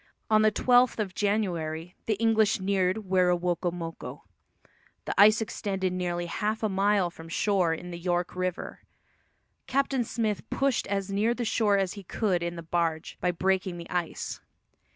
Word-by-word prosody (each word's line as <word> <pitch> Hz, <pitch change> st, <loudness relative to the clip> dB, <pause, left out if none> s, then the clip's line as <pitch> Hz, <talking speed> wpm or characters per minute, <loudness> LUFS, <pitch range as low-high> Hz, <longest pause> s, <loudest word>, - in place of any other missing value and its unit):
On 215 Hz, 0 st, +6 dB
the 215 Hz, -, +5 dB
twelfth 245 Hz, +2 st, +3 dB
of 200 Hz, -4 st, -2 dB
January 180 Hz, -6 st, -1 dB
the 220 Hz, -, +2 dB
English 220 Hz, -1 st, +3 dB
neared 190 Hz, +2 st, 0 dB
Werowocomoco. 175 Hz, -2 st, 0 dB, 0.8 s
The -, -, -2 dB
ice 215 Hz, +2 st, +6 dB
extended 195 Hz, -4 st, -2 dB
nearly 175 Hz, -1 st, -2 dB
half 215 Hz, +5 st, -2 dB
a 215 Hz, -, +2 dB
mile 195 Hz, -2 st, +2 dB
from 165 Hz, -1 st, -12 dB
shore 185 Hz, -1 st, +2 dB
in 180 Hz, +2 st, -5 dB
the 170 Hz, -, -6 dB
York 175 Hz, 0 st, -1 dB
River. 185 Hz, -1 st, -3 dB, 0.9 s
Captain 270 Hz, -1 st, +1 dB
Smith 220 Hz, -3 st, -1 dB
pushed 270 Hz, -2 st, 0 dB
as 195 Hz, -1 st, -2 dB
near 215 Hz, +4 st, +1 dB
the 245 Hz, -, -3 dB
shore 210 Hz, -2 st, +2 dB
as 190 Hz, -2 st, 0 dB
he 205 Hz, -, -8 dB
could 185 Hz, -1 st, 0 dB
in 170 Hz, 0 st, -3 dB
the 170 Hz, -, -7 dB
barge, 165 Hz, -1 st, -2 dB
by 180 Hz, -, +2 dB
breaking 185 Hz, 0 st, 0 dB
the 170 Hz, -, -9 dB
ice. 175 Hz, -2 st, -3 dB
190 Hz, 155 wpm, -28 LUFS, 175-215 Hz, 0.9 s, On